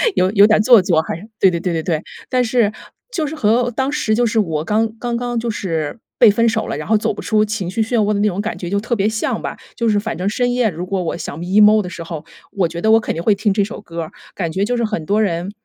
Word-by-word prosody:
有 185 +1 +2
有 205 -1 +6
点 215 -1 +4
做 235 0 +7
作 170 -3 +2
还 - - -4
是 210 - -12
对 190 - +6
对 170 - -2
对 180 -1 -2
对 160 - -1
对。 160 -3 -1 0.3
但 255 -1 +2
是， 230 -3 +2 0.4
就 325 -6 -1
是 305 - -5
和 235 -1 +2
当 265 +4 -1
时 225 -7 0
就 245 - +2
是 225 - -2
我 160 -6 -1
刚 220 +5 0
刚 240 -1 -2
刚 240 -1 -2
就 235 0 -3
是 165 -3 -3 0.2
被 235 - +8
分 230 +3 +2
手 225 -1 0
了， - - -3
然 150 - -6
后 220 - +3
走 210 - -1
不 - - -10
出 215 -1 +2
情 210 -4 -3
绪 225 +4 -1
漩 230 +2 0
涡 210 0 +2
的 200 - -1
那 210 - +2
种 195 0 -2
感 215 - -3
觉 175 - -5
就 200 +2 0
特 235 +3 -2
别 200 -1 +1
像 220 0 -2
吧。 - - -5 0.2
就 230 -2 0
是 205 -1 +2
反 220 -4 -4
正 185 +2 -2
深 245 +3 0
夜， 245 -3 +2
如 175 0 -5
果 190 0 -2
我 170 - -3
想 160 - -6
emo 210 +4 +5
的 180 - -6
时 180 -3 -7
候， 165 -2 -7 0.3
我 185 -4 +1
觉 170 +1 -7
得 220 - +3
我 225 - +6
肯 - - -3
定 165 - -3
会 215 - +4
听 205 +1 0
这 205 0 +2
首 210 +1 -6
歌 170 -4 -6
儿。 155 - -9 0.2
感 170 -4 -2
觉 190 +4 -1
就 245 +2 -1
是 235 - 0
很 215 -7 -3
多 205 +5 +1
人 175 -1 -1
210 Hz, 325 characters per minute, -18 LUFS, 180-225 Hz, 0.4 s, 被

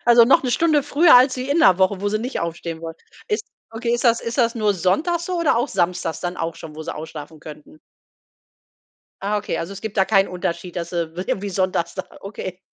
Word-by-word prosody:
Also, 235 -1 +7
noch 265 +3 +4
'ne 255 - -1
Stunde 310 +1 +3
früher 295 +4 +5
als 255 +2 +6
wie 255 +1 -4
in 285 +4 +2
'ner 190 - +5
Woche, 190 0 +2
wo 205 - 0
sie 215 +1 0
nicht 250 +5 -4
aufstehen 170 -1 -5
wollen. 165 -1 -6 0.3
Ist 425 +1 -1 0.3
okay, 230 +1 -3
ist 240 - -3
das 235 -1 +4
ist 230 +3 -5
das 230 -2 +3
nur 210 -3 +1
sonntags 310 - 0
so 365 -1 -2
oder 325 -8 +2
auch 240 +4 0
samstags 180 -5 -1
dann 175 0 -4
auch 165 0 -3
schon, 160 -2 -10
wo 160 - -6
sie - - -5
ausschlafen 155 0 -9
könnten? 150 0 -12 1.4
Ah, 205 +2 0
okay, 205 - -3
also, 170 +4 -5
es 195 - -10
gibt 220 -1 -5
da 190 - +4
keinen 195 -2 +3
Unterschied, 175 0 -4
dass 170 -1 -4
sie 170 -2 -3
w - - -11
irgendwie 200 +1 -2
sonntags 185 -3 -1
da 190 - -4 0.2
okay. 190 -2 -7
195 Hz, 230 wpm, -21 LUFS, 170-240 Hz, 1.4 s, Also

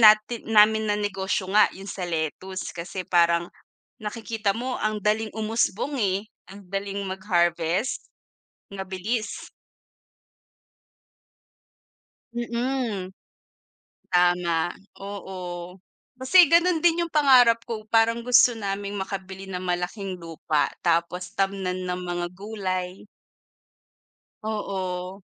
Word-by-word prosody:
nati 215 +1 +6
namin 220 0 +4
na 205 - +2
negosyo 190 -2 -1
nga 215 +1 +6
yung 195 - -10
sa 195 - -5
lettuce 175 +4 -3
kasi 175 +2 -6
parang 170 -1 +3 0.6
nakikita 220 -1 -2
mo 250 +2 -3
ang 215 0 0
daling 215 +1 0
umusbong 220 +4 0
eh, 200 0 0 0.2
ang 200 +1 -12
daling 195 +1 -3
mag-harvest. 180 +1 0 0.6
Mabilis. 195 +4 -4 2.9
Mm. 235 -4 -2 1.0
Tama, 175 -1 +2 0.2
oo. 185 -2 -7 0.4
Kasi 330 +5 +6
ganon 340 -1 +4
din 345 0 +4
yung 335 - -17
pangarap 250 -6 +6
ko, 220 -3 -6
parang 230 +1 +3
gusto 250 0 +6
naming 200 0 -3
makabili 190 0 -5
ng 180 -1 -4
malaking 180 +2 -3
lupa 165 -3 -1 0.2
tapos 175 +1 0
tamnan 190 -2 -1
ng 180 0 -2
mga 175 0 -2
gulay. 190 -2 -4 1.4
Oo. 190 -3 -4
195 Hz, 100 wpm, -25 LUFS, 180-220 Hz, 2.9 s, nati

